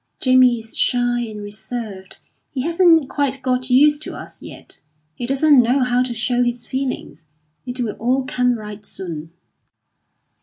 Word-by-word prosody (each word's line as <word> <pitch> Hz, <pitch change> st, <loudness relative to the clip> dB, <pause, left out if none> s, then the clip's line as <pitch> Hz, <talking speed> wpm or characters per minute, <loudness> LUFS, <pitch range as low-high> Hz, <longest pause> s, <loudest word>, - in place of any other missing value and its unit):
Jamie 255 Hz, -2 st, +5 dB
is 225 Hz, 0 st, -10 dB
shy 245 Hz, -1 st, +1 dB
and 210 Hz, -2 st, -8 dB
reserved; 205 Hz, -2 st, -6 dB, 0.3 s
he 260 Hz, -, -3 dB
hasn't 330 Hz, -1 st, +4 dB
quite 275 Hz, -1 st, -1 dB
got 255 Hz, 0 st, -1 dB
used 290 Hz, +4 st, +5 dB
to -, -, -7 dB
us -, -, -10 dB
yet. -, -, -10 dB, 0.3 s
He 240 Hz, -, -5 dB
doesn't 275 Hz, 0 st, +5 dB
know 250 Hz, +3 st, +2 dB
how 250 Hz, 0 st, +2 dB
to 250 Hz, -2 st, -2 dB
show 245 Hz, +2 st, 0 dB
his 240 Hz, 0 st, -1 dB
feelings. 260 Hz, -, -4 dB, 0.4 s
It 250 Hz, +1 st, -5 dB
will 220 Hz, -4 st, -2 dB
all 255 Hz, +3 st, +1 dB
come 250 Hz, -2 st, +1 dB
right 210 Hz, -1 st, -9 dB
soon." 165 Hz, -6 st, -6 dB
250 Hz, 155 wpm, -20 LUFS, 225-265 Hz, 0.4 s, Jamie